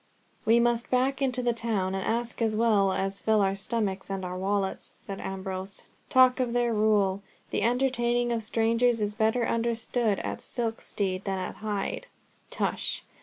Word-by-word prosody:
"We 225 +2 +5
must 235 0 +1
back 260 +2 +1
into 255 -2 +1
the 240 -1 +2
town 220 -5 0
and 190 0 -2
ask, 235 +1 -2
as 220 -1 +1
well 215 -4 +3
as 195 +1 -2
fill 220 -1 +3
our 195 -1 +2
stomachs 195 -1 -2
and 195 -1 -3
our 180 0 -4
wallets," 195 +1 -2
said 195 -1 -6
Ambrose. 190 0 -5 0.3
"Talk 255 0 +5
of 245 -2 0
their 240 -1 +2
rule! 205 -3 +2 0.3
The - - 0
entertaining 240 0 +1
of 230 -1 0
strangers 230 +2 +2
is 210 -1 -1
better 220 +2 +1
understood 230 -2 0
at - - -4
Silkstede 205 -5 -2
than 195 -1 -1
at 185 - -5
Hyde." 210 - -3 0.4
"Tush! - - -1
220 Hz, 165 wpm, -28 LUFS, 195-240 Hz, 0.4 s, We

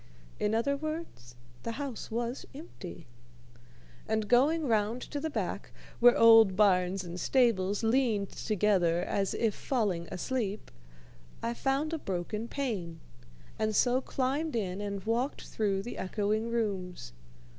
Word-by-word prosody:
In 210 +1 +1
other 280 +5 +1
words, 310 - -6 0.3
the 230 - -4
house 275 -3 -5
was 235 +3 -3
empty; 185 - -9 1.0
and 220 -1 0
going 290 +7 +3
round 225 0 +1
to 290 - -5
the 315 +2 -2
back, 305 - -3 0.3
where 245 0 +7
old 225 -4 +7
barns 190 -2 +3
and 175 0 -6
stables 205 -4 +2
leaned 225 -4 +1
together 185 -5 +1
as 195 +1 -1
if 225 -3 +1
falling 200 -11 -1
asleep, 215 0 -3 0.7
I 230 +1 0
found 275 +5 -1
a 325 - -1
broken 195 +2 -3
pane, 210 - -3 0.6
and 215 -1 0
so 250 +3 +3
climbed 275 +4 -1
in 195 -3 -2
and 200 -2 -4
walked 235 +6 -1
through 195 -3 -1
the 240 - -6
echoing 215 +3 -1
rooms. 190 - -3
220 Hz, 135 wpm, -30 LUFS, 195-255 Hz, 1.0 s, where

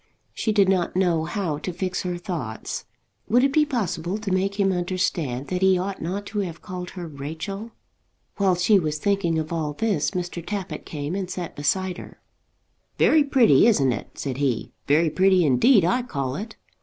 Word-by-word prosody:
She 220 - -1
did 205 -2 +4
not 185 -3 +1
know 175 -4 +2
how 170 -4 -2
to 180 - -4
fix 185 +2 -3
her 180 -1 -3
thoughts. 155 - -5 0.4
Would 245 +3 +4
it 275 0 +2
be 300 0 +4
possible 185 - -2
to 215 -3 -4
make 195 +2 0
him 195 -1 +3
understand 175 -7 -1
that 180 0 -2
he 190 -1 +5
ought 190 +2 -3
not 190 +5 -3
to 210 - 0
have 175 -5 -3
called 180 -1 -6
her 175 -2 -5
Rachel? 160 +9 -6 0.7
While 195 -3 +3
she 190 +3 +4
was 155 -3 -2
thinking 175 -2 +1
of 155 +1 -3
all 155 -3 -2
this 195 -2 0
Mr. 175 -1 -4
Tappitt 200 0 -5
came 150 +1 -4
and 190 -2 -3
sat 180 -2 -5
beside 185 +5 -1
her. - - -12 0.8
"Very 310 -2 +5
pretty; 260 -5 +5
isn't 140 - +4
it?" 105 - -8
said 135 -3 -3
he. 135 -5 -1 0.2
"Very 155 +2 +3
pretty 185 0 +4
indeed, 165 - +5
I 220 +9 +2
call 140 - -3
it." 220 +6 -6
180 Hz, 185 wpm, -24 LUFS, 160-200 Hz, 0.8 s, he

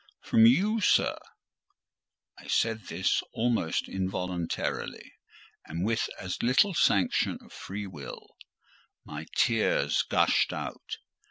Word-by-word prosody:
"From 115 0 +6
you, 200 - +3
sir." - - +3 1.2
I - - -14
said 110 -3 0
this 90 +3 0
almost 115 -8 0
involuntarily, 90 -2 -3 0.5
and, 85 +4 -3
with 115 +1 0
as 90 -2 -4
little 130 - +3
sanction 100 - +2
of - - -17
free 100 +2 -6
will, 75 -9 -9 0.8
my 75 +1 -7
tears 115 -3 +2
gushed - - +3
out. - - -6
100 Hz, 105 wpm, -28 LUFS, 90-115 Hz, 1.2 s, From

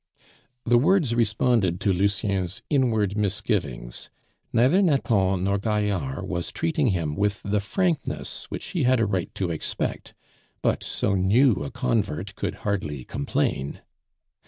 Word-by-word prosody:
The 120 0 +5
words 150 -3 +3
responded 110 -5 +2
to 100 -1 +2
Lucien's 100 -1 -1
inward 110 -8 +2
misgivings. 95 - -2 0.4
Neither 130 - +4
Nathan 100 - +2
nor 100 +1 +1
Gaillard 100 -10 -1
was 85 0 -3
treating 155 -4 0
him 85 -8 0
with 100 +1 0
the 105 +1 +1
frankness 165 - -2
which - - -5
he 175 - -1
had 130 -1 +3
a 115 - +3
right 95 -4 -1
to 90 -3 -1
expect, 80 - -3 0.5
but - - +1
so 100 - -1
new 100 - +3
a 70 - -4
convert 80 +9 -1
could - - -3
hardly 75 -10 -2
complain. 70 +1 -2
100 Hz, 135 wpm, -25 LUFS, 90-120 Hz, 0.5 s, The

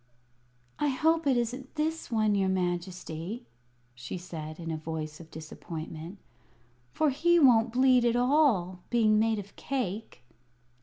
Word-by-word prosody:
"I 295 - +2
hope 320 +3 +2
it 260 -3 +4
isn't 250 +3 -3
this 315 +1 -2
one, 215 -3 +2
your 195 -1 +2
Majesty!" 180 +3 -3 0.5
she 120 +7 -6
said, 160 -3 -7
in 165 -1 -4
a - - -1
voice 155 -1 -5
of 165 -1 -12
disappointment; 160 +2 -8 0.7
"for 305 - +2
he 345 +6 +3
won't 240 -6 +5
bleed 255 0 +4
at 235 0 +2
all, 245 - +3
being 215 -3 +4
made 220 0 +2
of 200 -1 -8
cake." 220 - -4
215 Hz, 140 wpm, -29 LUFS, 170-255 Hz, 0.7 s, won't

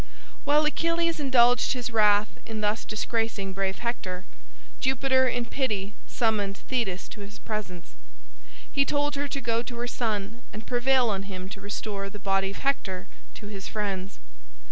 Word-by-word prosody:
While 300 +1 +5
Achilles 335 +1 +1
indulged 245 -3 +5
his 245 -2 -3
wrath 210 -1 +5
in 220 -2 -4
thus 210 +2 +1
disgracing 215 -3 -1
brave 190 0 0
Hector, 190 -6 -3 0.5
Jupiter 260 0 +3
in 245 -1 0
pity 210 -7 -1
summoned 205 -4 +1
Thetis 220 -8 -1
to 210 - -9
his 205 +2 -8
presence. 205 - -5 0.8
He 280 - +4
told 290 +1 +1
her 285 0 -1
to 280 - -3
go 230 -3 +1
to 240 +1 -7
her 240 +1 -2
son 225 -1 -2
and 215 +1 -8
prevail 250 -1 +3
on 195 0 -3
him 185 -1 -5
to 195 0 -8
restore 200 0 -3
the 210 - -8
body 195 -1 +1
of 200 - -7
Hector 190 -9 -1 0.3
to 210 - -9
his 200 -2 -6
friends. 200 -2 -3
220 Hz, 160 wpm, -28 LUFS, 195-255 Hz, 0.8 s, While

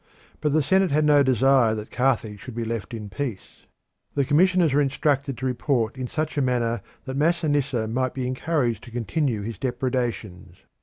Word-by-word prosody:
But 150 - 0
the 155 -1 +3
Senate 190 +5 +3
had 150 +1 +2
no 145 -1 +5
desire 130 -3 +4
that 105 0 -7
Carthage 115 -5 0
should 125 -3 -9
be 120 -1 -2
left 115 +1 -4
in 110 -3 -6
peace. 110 0 -6 0.5
The 140 -1 +2
commissioners 175 +1 +3
were 145 - +4
instructed 140 -1 0
to 130 - -4
report 125 -2 0
in 130 -1 -4
such 155 +2 -2
a - - +2
manner 120 -4 0 0.2
that 130 -1 -4
Masinissa 145 -7 +1
might 130 +3 -1
be 130 -2 -2
encouraged 125 - -1
to - - -11
continue 120 - -1
his 115 +2 -6
depredations. 120 -8 -3
130 Hz, 175 wpm, -24 LUFS, 115-145 Hz, 0.5 s, no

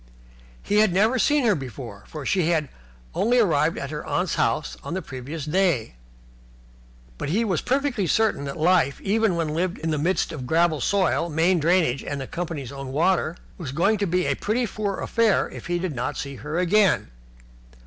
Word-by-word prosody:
He 205 - 0
had 215 -3 +4
never 215 +8 +3
seen 290 +5 +3
her 220 - +5
before, 125 - -7
for 150 -3 -7
she 185 -4 +1
had 155 -5 +1 0.4
only 240 +4 +2
arrived 165 -8 +2
at 140 - -5
her 150 -1 -5
aunt's 180 -2 -1
house 115 +6 0
on 170 - -4
the 190 - -2
previous 140 +3 -6
day, 165 - +1 1.3
but - - -3
he 215 +8 +1
was 185 -6 0
perfectly 265 -7 0
certain 220 -7 +1
that 140 +2 -5
life, 160 -4 +2
even 210 -1 +1
when 165 -2 -1
lived 170 +4 -1
in 160 +1 -2
the 155 - 0
midst 170 +3 0
of 135 -6 -6
gravel 160 0 +2
soil, 190 -3 +1
main 170 +3 +2
drainage, 160 -5 +2
and 140 -2 -5
company's 160 -7 -4
own 135 -1 -7
water, 170 +2 +1 0.2
was 150 -7 -5
going 190 +9 +2
to 200 - 0
be 180 +1 +1
a - - +2
pretty 235 +4 0
poor 205 -2 -3
affair 230 -3 +2
if - - -9
he 175 0 0
did 175 -2 -3
not 130 +4 -3
see 140 -2 -5
her 150 +5 -4
again. 185 - +3
170 Hz, 190 wpm, -24 LUFS, 145-195 Hz, 1.3 s, her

